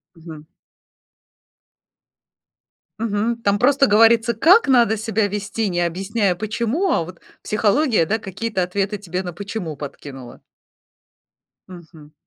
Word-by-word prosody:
Мгм. 160 Hz, -2 st, -11 dB, 2.6 s
Мгм. 230 Hz, +1 st, -2 dB
Там 200 Hz, 0 st, +1 dB
просто 275 Hz, +4 st, +3 dB
говорится, 225 Hz, +2 st, +4 dB
как 340 Hz, -, +5 dB
надо 235 Hz, -4 st, +4 dB
себя 220 Hz, -1 st, -1 dB
вести, 210 Hz, +1 st, -3 dB
не 175 Hz, -1 st, -2 dB
объясняя 190 Hz, +3 st, -1 dB
почему, 235 Hz, -, -2 dB
а -, -, +1 dB
вот 180 Hz, 0 st, -12 dB, 0.2 s
психология, 215 Hz, -, +1 dB
да, 220 Hz, +5 st, 0 dB
какие-то 205 Hz, 0 st, -4 dB
ответы 195 Hz, +3 st, -2 dB
тебе 185 Hz, -1 st, -4 dB
на 180 Hz, -1 st, -6 dB
почему 190 Hz, -3 st, -6 dB
подкинула. 135 Hz, -3 st, -10 dB, 1.3 s
Мгм. 160 Hz, -4 st, -14 dB
205 Hz, 115 wpm, -20 LUFS, 175-230 Hz, 2.6 s, как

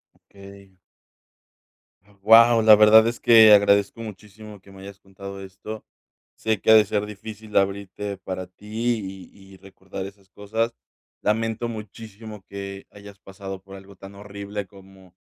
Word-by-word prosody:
Okey. 100 Hz, -1 st, -17 dB, 1.4 s
Guau, 115 Hz, +2 st, +6 dB
la 110 Hz, -1 st, +8 dB
verdad 110 Hz, +1 st, +6 dB
es 115 Hz, -, -4 dB
que 110 Hz, -2 st, +7 dB
agradezco 100 Hz, +2 st, +3 dB
muchísimo 105 Hz, 0 st, -11 dB
que 100 Hz, -, -18 dB
me 95 Hz, 0 st, -14 dB
hayas 100 Hz, 0 st, -12 dB
contado 100 Hz, 0 st, -11 dB
esto. 100 Hz, +3 st, -10 dB, 0.5 s
Sé 110 Hz, -2 st, -2 dB
que 110 Hz, -, +3 dB
ha -, -, +8 dB
de 110 Hz, -1 st, +6 dB
ser 105 Hz, 0 st, -2 dB
difícil 105 Hz, +1 st, -11 dB
abrirte 100 Hz, 0 st, -2 dB
para 95 Hz, -1 st, -7 dB
ti, 105 Hz, -1 st, -5 dB
y 95 Hz, -1 st, -18 dB
y -, -, -15 dB
recordar 95 Hz, 0 st, -10 dB
esas 100 Hz, -1 st, -14 dB
cosas. 110 Hz, +4 st, -3 dB, 0.5 s
Lamento 115 Hz, +2 st, -1 dB
muchísimo 110 Hz, -1 st, -10 dB
que 100 Hz, 0 st, -8 dB
hayas 100 Hz, -1 st, -14 dB
pasado 95 Hz, -1 st, -9 dB
por 95 Hz, 0 st, -13 dB
algo 95 Hz, 0 st, -14 dB
tan 95 Hz, +1 st, -13 dB
horrible 100 Hz, 0 st, -8 dB
como 95 Hz, -2 st, -19 dB
100 Hz, 145 wpm, -23 LUFS, 95-110 Hz, 1.4 s, la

